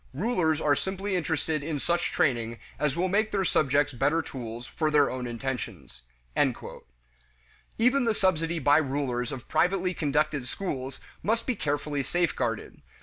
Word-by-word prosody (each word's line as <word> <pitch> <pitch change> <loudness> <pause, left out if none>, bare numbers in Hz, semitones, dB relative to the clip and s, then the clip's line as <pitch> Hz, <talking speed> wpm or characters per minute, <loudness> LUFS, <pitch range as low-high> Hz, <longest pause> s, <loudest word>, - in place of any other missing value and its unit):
Rulers 165 - +1
are 145 -2 +3
simply 190 +4 -2
interested 160 -3 0
in 150 +1 -2
such 175 +5 0
training 115 -4 +1 0.2
as 150 -2 +1
will 180 +2 +1
make 210 +4 +2
their 195 -2 +1
subjects 145 -2 +2
better 155 +6 +2
tools 120 -4 -6
for 155 +5 -1
their 150 -2 +4
own 125 -1 -3
intentions." 120 - -5 1.8
Even 250 +3 +3
the 225 -2 +2
subsidy 170 -4 +1
by 145 -1 +5
rulers 135 -4 -1
of 130 -3 -7
privately 185 0 +2
conducted 150 -4 0
schools 135 -5 -4 0.2
must 230 +2 0
be 255 - 0
carefully 145 -2 -1
safeguarded. 130 -8 -1
150 Hz, 145 wpm, -28 LUFS, 135-180 Hz, 1.8 s, by